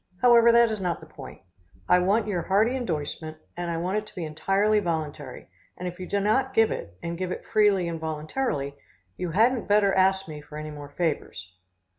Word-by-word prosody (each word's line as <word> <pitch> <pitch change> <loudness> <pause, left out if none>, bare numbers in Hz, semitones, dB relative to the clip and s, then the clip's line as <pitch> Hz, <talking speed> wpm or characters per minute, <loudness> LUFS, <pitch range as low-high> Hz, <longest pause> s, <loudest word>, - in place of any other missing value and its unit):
However, 235 -1 +7
that 235 -1 +5
is 215 -2 -3
not 175 -2 -1
the 160 - -12
point. 140 -4 -11 0.5
I 180 - +5
want 200 +5 +2
your 195 -5 -1
hearty 210 +8 +2
indorsement 155 - -4 0.2
and 175 0 -4
I 165 - -2
want 185 +5 0
it 215 - -11
to - - -15
be 175 - -4
entirely 195 +7 +1
voluntary, 155 -7 -4 0.3
and 180 - -5
if 180 +1 -7
you 185 - -6
do 200 - 0
not 255 +6 +1
give 225 0 +4
it, 85 +1 -6
and 170 0 -4
give 185 -1 -2
it - - -5
freely 205 -5 +3
and 165 -1 -4
voluntarily, 155 - -3 0.4
you 180 - -4
hadn't 230 +8 +2
better 205 -1 +4
ask 190 0 +2
me 150 -2 -8
for 150 +1 -11
any 155 0 -6
more 145 -1 -9
favors. 145 - -3
180 Hz, 205 wpm, -26 LUFS, 155-210 Hz, 0.5 s, However